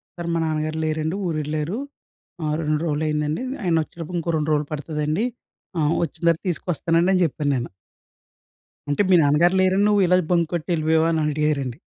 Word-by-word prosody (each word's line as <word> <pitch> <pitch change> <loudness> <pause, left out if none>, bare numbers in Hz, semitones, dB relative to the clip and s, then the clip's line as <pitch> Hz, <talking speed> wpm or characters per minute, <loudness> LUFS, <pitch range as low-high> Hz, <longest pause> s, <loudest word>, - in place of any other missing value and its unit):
Sir 170 -1 -5
మా 165 - +1
నాన్నగారు 155 0 -2
లేరండి, 155 +2 -1
ఊరెళ్లారు. 155 +3 -2 0.7
ఆహ్, 150 0 0
2 150 -1 0
రోజులు 150 0 -1
అయిందండి. 150 +6 -1 0.2
ఆయన 175 -3 +2
వచ్చేటప్పుడు 170 +2 -7
ఇంకో 170 0 -2
2 155 0 -1
రోజులు 150 -1 0
పడుతదండి. 150 +6 -1 0.5
ఆహ్, 150 +1 +2
వచ్చిన 170 - -5
తర్వాత 165 - +1
తీసుకొస్తానండి 170 +1 0
అని 185 - +2
చెప్పాను 145 -1 -1
నేను. 120 -1 -3 1.2
అంటే 145 - +1
మీ 185 - +6
నాన్నగారు 160 +5 +4
లేరని 190 +2 +3
నువ్వు 205 -1 +3
ఇలా 180 +1 +4
బంక్ 170 -2 +2
కొట్టి 170 +1 -3
ఎళ్ళిపోయావా? 160 0 +2
అని 160 - +1
అడిగారండి. 145 -4 -1
155 Hz, 165 wpm, -23 LUFS, 150-170 Hz, 1.2 s, మీ